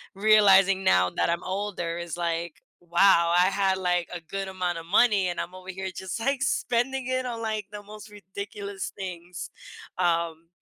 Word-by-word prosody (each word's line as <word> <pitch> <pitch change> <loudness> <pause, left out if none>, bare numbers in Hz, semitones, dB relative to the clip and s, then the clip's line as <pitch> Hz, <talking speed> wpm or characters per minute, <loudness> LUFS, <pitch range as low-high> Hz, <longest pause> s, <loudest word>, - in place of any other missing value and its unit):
realizing 195 -2 +5
now 90 0 +4
that - - +2
I'm 170 +1 -1
older, 185 -3 -3
is 170 -2 -5
like, 170 -1 -3 0.2
wow, 170 -1 +4
I 180 - +5
had, 195 -1 +1
like, 180 -2 0
a 175 - -6
good 195 +4 -5
amount 180 -2 -2
of 165 - -8
money, 200 +1 +3
and 175 -1 -2
I'm 180 - -7
over 185 0 -12
here 190 0 -4
just, 190 +3 -5
like, 275 +2 0
spending 255 0 0
it 255 0 -1
on, 235 -2 -4
like, 215 -2 -2
the 205 0 -7
most 210 +1 -11
ridiculous 200 0 -7
things, 180 -2 -7 0.5
um, 170 -2 0
190 Hz, 175 wpm, -26 LUFS, 175-205 Hz, 0.5 s, realizing